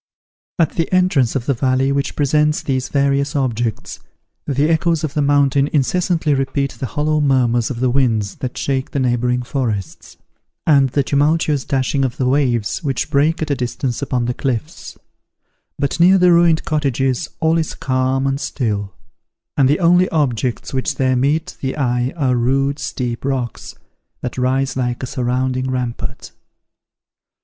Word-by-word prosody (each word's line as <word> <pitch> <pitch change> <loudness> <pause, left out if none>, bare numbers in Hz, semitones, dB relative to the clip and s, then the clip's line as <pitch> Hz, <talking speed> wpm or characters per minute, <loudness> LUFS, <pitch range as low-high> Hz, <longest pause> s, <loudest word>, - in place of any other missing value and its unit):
At 165 -4 +2
the 165 - -1
entrance 180 -10 +2
of 125 -3 -2
the 140 - +1
valley 130 +2 +1
which 140 0 -1
presents 150 +1 +1
these 130 -2 -2
various 140 0 +1
objects, 120 -5 -2 0.5
the 140 +1 +1
echoes 165 0 +1
of 150 -3 -2
the 150 - 0
mountain 140 -1 +3
incessantly 160 +2 +1
repeat 135 0 -1
the 130 - -5
hollow 150 +2 0
murmurs 120 -5 +2
of 120 -2 -5
the 130 - +2
winds 115 -6 0
that 125 -2 -5
shake 135 -1 -1
the 140 - -2
neighbouring 125 -1 0
forests, 115 - -4 0.5
and 140 -4 +4
the 140 +2 +1
tumultuous 145 0 +1
dashing 135 0 0
of 130 +1 -2
the 130 - 0
waves 125 -5 +1
which 135 -4 -2
break 155 +4 +2
at 155 - -3
a - - +2
distance 125 0 -3
upon 125 -3 -1
the 125 - -1
cliffs; 135 +5 -4 0.8
but 140 +3 -2
near 185 +3 +6
the 180 -1 +5
ruined 170 -2 +4
cottages 135 -1 0
all 160 +1 +2
is 160 - -3
calm 130 0 0
and 135 +1 -1
still, 105 -8 -3 0.6
and 135 -4 +3
the 145 - +2
only 180 +1 +4
objects 130 -7 -1
which 130 -1 -1
there 130 -1 +1
meet 150 +7 0
the 130 +1 -3
eye 125 -2 0
are 130 -5 +1
rude 135 +4 +1
steep 120 -2 -4
rocks, 130 -4 -3 0.5
that 125 - -4
rise 130 +1 0
like 125 -1 -2
a - - 0
surrounding 130 0 -1
rampart. 125 -2 -4
135 Hz, 160 wpm, -18 LUFS, 125-150 Hz, 0.8 s, near